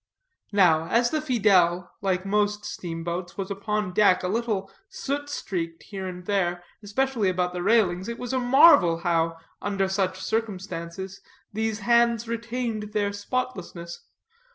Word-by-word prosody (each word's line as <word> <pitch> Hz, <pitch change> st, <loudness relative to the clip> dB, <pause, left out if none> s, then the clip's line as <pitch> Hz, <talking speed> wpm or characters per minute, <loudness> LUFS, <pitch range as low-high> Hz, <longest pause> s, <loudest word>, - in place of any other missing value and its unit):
Now, 170 Hz, -5 st, +4 dB
as 240 Hz, +4 st, +2 dB
the 310 Hz, -, +1 dB
Fidèle, 195 Hz, -, +3 dB
like 190 Hz, -1 st, 0 dB
most 210 Hz, +1 st, 0 dB
steamboats, 170 Hz, +1 st, -5 dB
was 195 Hz, 0 st, -4 dB
upon 205 Hz, -1 st, -2 dB
deck 195 Hz, -2 st, +4 dB
a -, -, 0 dB
little 210 Hz, -2 st, -1 dB, 0.2 s
soot 290 Hz, -6 st, -4 dB
streaked 165 Hz, -10 st, -4 dB
here 195 Hz, -2 st, -6 dB
and 180 Hz, -1 st, -7 dB
there, 175 Hz, -3 st, 0 dB, 0.2 s
especially 225 Hz, 0 st, 0 dB
about 180 Hz, -1 st, -1 dB
the 180 Hz, -, -3 dB
railings, 190 Hz, -2 st, +2 dB
it 235 Hz, -, -4 dB
was 245 Hz, 0 st, -5 dB
marvel 255 Hz, -, +6 dB
how, 165 Hz, -1 st, +1 dB, 0.2 s
under 195 Hz, -1 st, 0 dB
such 190 Hz, -1 st, -1 dB
circumstances, 190 Hz, -3 st, -4 dB, 0.3 s
these 220 Hz, 0 st, -2 dB
hands 235 Hz, +1 st, +3 dB
retained 230 Hz, -2 st, -3 dB
their 205 Hz, -1 st, 0 dB
spotlessness. 200 Hz, -6 st, -4 dB
200 Hz, 135 wpm, -25 LUFS, 180-230 Hz, 0.3 s, marvel